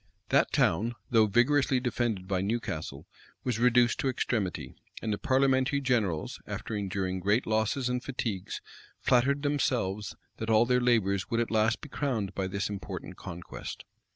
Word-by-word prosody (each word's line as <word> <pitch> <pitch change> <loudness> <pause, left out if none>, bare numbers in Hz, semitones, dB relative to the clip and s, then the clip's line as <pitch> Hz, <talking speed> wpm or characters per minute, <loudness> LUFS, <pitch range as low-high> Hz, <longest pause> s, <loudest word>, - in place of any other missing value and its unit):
That - - +3
town, 115 +8 +2 0.2
though 110 -2 +5
vigorously 130 +5 +3
defended 120 -6 -1
by 95 -1 0
Newcastle, 95 -9 -3 0.4
was 120 -3 -1
reduced 120 0 +4
to 135 - +1
extremity; 110 -6 -2 0.3
and 110 - -2
the 105 - -3
parliamentary 135 +1 +2
generals, 110 - 0
after 110 - -4
enduring 95 -2 -2
great 100 +6 +2
losses 110 +4 +1
and 125 0 -1
fatigues, 115 -8 -3 0.4
flattered 140 +3 +2
themselves 115 -9 0 0.2
that 110 - -4
all 110 +1 +5
their 125 +1 +2
labors 100 -6 +2
would 115 - +1
at 120 - -1
last 110 +1 +2
be 150 - -9
crowned 120 -10 -2
by 95 -1 -2
this 100 +2 -2
important 95 -2 -6
conquest. 90 -2 -8
115 Hz, 155 wpm, -29 LUFS, 100-125 Hz, 0.4 s, though